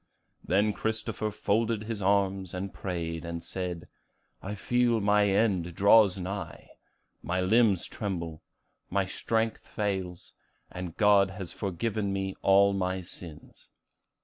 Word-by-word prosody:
Then 105 Hz, +3 st, +2 dB
Christopher 110 Hz, 0 st, -2 dB
folded 110 Hz, +1 st, 0 dB
his 110 Hz, -2 st, -4 dB
arms, 95 Hz, -2 st, +1 dB
and 95 Hz, +1 st, -4 dB
prayed, 85 Hz, -3 st, -4 dB
and 85 Hz, 0 st, -5 dB
said, 90 Hz, -3 st, -5 dB, 0.5 s
'I 105 Hz, +2 st, -5 dB
feel 120 Hz, +3 st, +2 dB
my 105 Hz, 0 st, +3 dB
end 95 Hz, -5 st, +1 dB
draws 100 Hz, -1 st, +6 dB
nigh. 95 Hz, +2 st, -6 dB, 0.5 s
My 90 Hz, +1 st, -2 dB
limbs 100 Hz, 0 st, +3 dB
tremble; 85 Hz, -6 st, -5 dB, 0.5 s
my 100 Hz, +1 st, +1 dB
strength 110 Hz, +4 st, -2 dB
fails; 95 Hz, -4 st, -3 dB, 0.4 s
and 90 Hz, -2 st, -6 dB
God 100 Hz, -2 st, +5 dB
has 95 Hz, -2 st, -7 dB
forgiven 100 Hz, +1 st, -2 dB
me 95 Hz, -1 st, -2 dB
all 100 Hz, +1 st, +5 dB
my 95 Hz, -1 st, -1 dB
sins. 85 Hz, -3 st, -11 dB
95 Hz, 120 wpm, -28 LUFS, 90-105 Hz, 0.5 s, draws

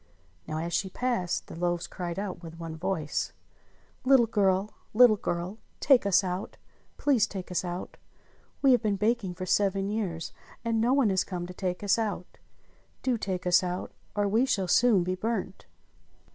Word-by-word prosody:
Now, 155 Hz, -1 st, -3 dB
as 170 Hz, +2 st, -3 dB
she 190 Hz, +3 st, 0 dB
passed, 210 Hz, -5 st, -1 dB
the -, -, -10 dB
loaves 175 Hz, 0 st, -1 dB
cried 175 Hz, 0 st, -5 dB
out 195 Hz, -3 st, -4 dB
with 165 Hz, -1 st, -10 dB
one 165 Hz, -1 st, -6 dB
voice: 160 Hz, -2 st, -2 dB, 0.7 s
"Little 255 Hz, -2 st, +6 dB
girl! 200 Hz, -2 st, +1 dB, 0.2 s
Little 240 Hz, -2 st, +7 dB
girl! 180 Hz, +2 st, -3 dB, 0.2 s
Take 260 Hz, -7 st, +4 dB
us 195 Hz, 0 st, +4 dB
out! 185 Hz, +1 st, -4 dB, 0.4 s
Please 250 Hz, -6 st, +3 dB
take 190 Hz, -4 st, -7 dB
us 180 Hz, -, 0 dB
out! 175 Hz, 0 st, -5 dB, 0.7 s
We 270 Hz, -, +6 dB
have 250 Hz, -, +5 dB
been 210 Hz, -3 st, +1 dB
baking 210 Hz, -2 st, 0 dB
for 185 Hz, +1 st, -5 dB
seven 195 Hz, 0 st, +1 dB
years, 190 Hz, -7 st, -3 dB, 0.3 s
and 225 Hz, -1 st, +1 dB
no 240 Hz, +2 st, +3 dB
one 265 Hz, -6 st, +3 dB
has 185 Hz, -1 st, +2 dB
come 180 Hz, -2 st, -5 dB
to 180 Hz, -, -8 dB
take 180 Hz, 0 st, -3 dB
us 205 Hz, +2 st, +3 dB
out. 205 Hz, -5 st, -4 dB, 0.6 s
Do 255 Hz, -2 st, +2 dB
take 190 Hz, -5 st, -3 dB
us 180 Hz, +1 st, +5 dB
out 180 Hz, 0 st, -4 dB, 0.2 s
or 205 Hz, -1 st, +1 dB
we 220 Hz, +5 st, +3 dB
shall 200 Hz, -8 st, 0 dB
soon 215 Hz, 0 st, +4 dB
be 185 Hz, +1 st, -1 dB
burnt!" 195 Hz, -, -3 dB
195 Hz, 175 wpm, -28 LUFS, 180-220 Hz, 0.7 s, Little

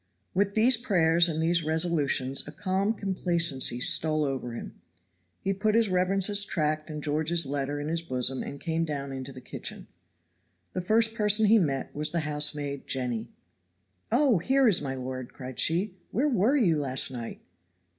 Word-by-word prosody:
With 200 Hz, +1 st, 0 dB
these 235 Hz, +3 st, +4 dB
prayers 170 Hz, -7 st, +3 dB
and 160 Hz, -1 st, -3 dB
these 165 Hz, +1 st, +1 dB
resolutions 150 Hz, -5 st, 0 dB
a -, -, -7 dB
calm 190 Hz, +5 st, -1 dB
complacency 170 Hz, -, 0 dB
stole 155 Hz, +2 st, +3 dB
over 130 Hz, -3 st, -4 dB
him; 115 Hz, -, -9 dB, 0.6 s
he 195 Hz, -, -1 dB
put 210 Hz, +2 st, 0 dB
his 230 Hz, -2 st, +3 dB
reverence's 195 Hz, +2 st, +3 dB
tract 155 Hz, -4 st, -2 dB
and 150 Hz, -1 st, -6 dB
George's 160 Hz, +2 st, 0 dB
letter 140 Hz, +1 st, -3 dB
in 145 Hz, -, -4 dB
his 165 Hz, +1 st, -1 dB
bosom 130 Hz, -4 st, 0 dB
and 140 Hz, -, -7 dB
came 165 Hz, 0 st, -2 dB
down 140 Hz, -3 st, -4 dB
into 135 Hz, 0 st, -6 dB
the 130 Hz, -, -11 dB
kitchen. -, -, -7 dB, 0.9 s
The 185 Hz, -, -2 dB
first 220 Hz, +4 st, +2 dB
person 210 Hz, 0 st, +3 dB
he 220 Hz, +2 st, +5 dB
met 140 Hz, -7 st, -2 dB
was 150 Hz, +1 st, -1 dB
the 170 Hz, -, -1 dB
housemaid, 150 Hz, -2 st, -1 dB
Jenny. 125 Hz, -4 st, -2 dB, 0.8 s
"Oh, 250 Hz, -, +3 dB
here 265 Hz, +8 st, +2 dB
is 195 Hz, -8 st, +5 dB
my 135 Hz, -2 st, -4 dB
lord!" 130 Hz, -1 st, -6 dB
cried 130 Hz, -2 st, -9 dB
she. 185 Hz, +3 st, 0 dB
"Where 260 Hz, +9 st, 0 dB
were 245 Hz, +2 st, +2 dB
you 170 Hz, -, +2 dB
last 135 Hz, -1 st, 0 dB
night?" 120 Hz, -3 st, -7 dB
160 Hz, 165 wpm, -27 LUFS, 140-195 Hz, 0.9 s, he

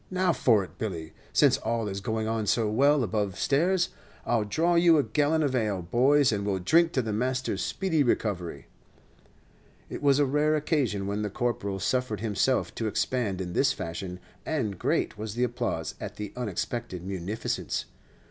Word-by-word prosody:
Now 185 Hz, -1 st, +2 dB
for 115 Hz, -6 st, +3 dB
it, 95 Hz, -, -13 dB
Billy. 85 Hz, -7 st, -4 dB, 0.2 s
Since -, -, +4 dB
all 115 Hz, -1 st, -1 dB
is 100 Hz, 0 st, -4 dB
going 110 Hz, +2 st, -2 dB
on 110 Hz, -1 st, -1 dB
so 110 Hz, +2 st, +2 dB
well 140 Hz, +6 st, +3 dB
above 100 Hz, -2 st, -1 dB
stairs, 175 Hz, +6 st, +2 dB, 0.4 s
I'll 115 Hz, -3 st, +1 dB
draw 165 Hz, +11 st, +1 dB
you 170 Hz, -1 st, +5 dB
a 145 Hz, -, +3 dB
gallon 150 Hz, +2 st, +1 dB
of 140 Hz, -3 st, 0 dB
ale, 105 Hz, -7 st, 0 dB
boys, 130 Hz, +8 st, +4 dB
and 100 Hz, -2 st, -1 dB
we 100 Hz, -, -1 dB
'll 95 Hz, -, 0 dB
drink 165 Hz, -, +3 dB
to 130 Hz, -, +1 dB
the 110 Hz, -2 st, -3 dB
master's 130 Hz, +4 st, -1 dB
speedy 175 Hz, -6 st, 0 dB
recovery." 90 Hz, -, -1 dB, 1.3 s
It -, -, -5 dB
was 140 Hz, -1 st, +4 dB
a 145 Hz, -, +4 dB
rare 150 Hz, +3 st, +2 dB
occasion 140 Hz, -, 0 dB
when 100 Hz, +1 st, -2 dB
the 105 Hz, -, -2 dB
Corporal 100 Hz, -3 st, -2 dB
suffered 125 Hz, +1 st, -1 dB
himself 115 Hz, +4 st, +1 dB
to 115 Hz, -, -2 dB
expand 105 Hz, -2 st, -1 dB
in 90 Hz, -1 st, -5 dB
this -, -, +3 dB
fashion, 90 Hz, +2 st, -5 dB, 0.2 s
and 110 Hz, -, -2 dB
great -, -, 0 dB
was 110 Hz, 0 st, -5 dB
the 120 Hz, -, +1 dB
applause 120 Hz, -1 st, -2 dB
at -, -, -6 dB
the 105 Hz, -1 st, -6 dB
unexpected 110 Hz, -4 st, -4 dB
munificence. 95 Hz, +4 st, -3 dB
115 Hz, 175 wpm, -27 LUFS, 100-140 Hz, 1.3 s, you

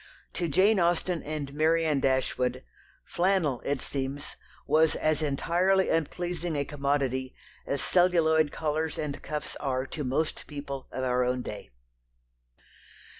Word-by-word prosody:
To 175 Hz, -, -1 dB
Jane 190 Hz, +7 st, +4 dB
Austen 175 Hz, 0 st, +1 dB
and 145 Hz, -2 st, -5 dB
Marianne 160 Hz, -1 st, +2 dB
Dashwood 130 Hz, -, 0 dB, 0.4 s
flannel, 170 Hz, -8 st, +1 dB
it 140 Hz, -2 st, -1 dB
seems, 140 Hz, +1 st, -4 dB, 0.3 s
was 160 Hz, 0 st, +3 dB
as 155 Hz, 0 st, +1 dB
entirely 175 Hz, +6 st, +2 dB
unpleasing 170 Hz, +1 st, -1 dB
a 140 Hz, -1 st, 0 dB
commodity 140 Hz, -3 st, -1 dB, 0.3 s
as 140 Hz, -, -1 dB
celluloid 160 Hz, -4 st, +3 dB
collars 155 Hz, 0 st, -2 dB
and 150 Hz, -2 st, -4 dB
cuffs 150 Hz, -1 st, -5 dB
are 130 Hz, -2 st, -1 dB
to 150 Hz, +2 st, -5 dB
most 140 Hz, +5 st, -1 dB
people 140 Hz, -2 st, -6 dB
of 130 Hz, -, -3 dB
our 125 Hz, 0 st, +2 dB
own 125 Hz, 0 st, 0 dB
day. 105 Hz, -, -7 dB
150 Hz, 125 wpm, -28 LUFS, 135-165 Hz, 0.4 s, Jane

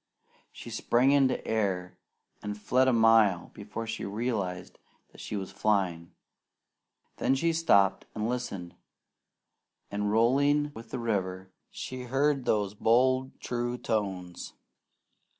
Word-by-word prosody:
She -, -, -10 dB
sprang 125 Hz, +3 st, +2 dB
into 135 Hz, -2 st, +2 dB
air, 95 Hz, -5 st, -1 dB, 0.4 s
and 105 Hz, 0 st, -5 dB
fled 130 Hz, +5 st, +2 dB
a -, -, +5 dB
mile 110 Hz, -6 st, +4 dB
before 105 Hz, +2 st, -6 dB
she 115 Hz, 0 st, -5 dB
realized 100 Hz, -4 st, -3 dB, 0.3 s
that -, -, -13 dB
she -, -, -5 dB
was 95 Hz, -2 st, -4 dB
flying. 90 Hz, -6 st, 0 dB, 1.1 s
Then 135 Hz, -, +2 dB
she 165 Hz, +5 st, +1 dB
stopped 100 Hz, -13 st, +3 dB
and 110 Hz, 0 st, -1 dB
listened, 110 Hz, -8 st, -4 dB, 1.2 s
and 105 Hz, 0 st, -1 dB
rolling 140 Hz, +6 st, +3 dB
with 115 Hz, 0 st, -11 dB
the 130 Hz, -, -4 dB
river, 95 Hz, -5 st, -2 dB, 0.2 s
she 130 Hz, -1 st, -6 dB
heard 135 Hz, +1 st, +1 dB
those 105 Hz, -2 st, +1 dB
bold 130 Hz, +5 st, +2 dB
true 120 Hz, 0 st, -3 dB
tones. 95 Hz, -7 st, -3 dB
110 Hz, 120 wpm, -29 LUFS, 100-125 Hz, 1.2 s, a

